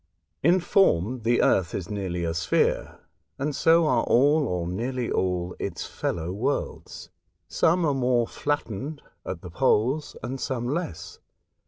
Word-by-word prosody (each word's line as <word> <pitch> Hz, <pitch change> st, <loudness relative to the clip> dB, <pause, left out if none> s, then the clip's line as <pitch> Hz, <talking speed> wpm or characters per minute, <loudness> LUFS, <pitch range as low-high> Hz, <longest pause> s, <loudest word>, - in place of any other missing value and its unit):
In 175 Hz, +5 st, +4 dB
form, 130 Hz, -, +2 dB
the 120 Hz, +2 st, +2 dB
Earth 90 Hz, -2 st, +2 dB
is 90 Hz, -, -4 dB
nearly 95 Hz, -4 st, -3 dB
a 80 Hz, -1 st, -1 dB
sphere, 85 Hz, -, 0 dB, 0.4 s
and 145 Hz, +1 st, -2 dB
so 165 Hz, +2 st, +4 dB
are 125 Hz, -6 st, +3 dB
all, 145 Hz, +4 st, +4 dB
or 90 Hz, -2 st, -2 dB
nearly 120 Hz, +7 st, -3 dB
all, 90 Hz, -1 st, -1 dB
its -, -, -4 dB
fellow 85 Hz, 0 st, -3 dB
worlds; 125 Hz, +9 st, -3 dB, 0.4 s
some 170 Hz, +1 st, +2 dB
are 145 Hz, -, +2 dB
more 125 Hz, -2 st, +2 dB
flattened 145 Hz, 0 st, -3 dB, 0.2 s
at 90 Hz, -3 st, -5 dB
the 90 Hz, -, -8 dB
poles, 130 Hz, -, +1 dB
and 130 Hz, +1 st, -4 dB
some 120 Hz, -2 st, -2 dB
less. 95 Hz, -, -4 dB
120 Hz, 145 wpm, -26 LUFS, 90-145 Hz, 0.4 s, In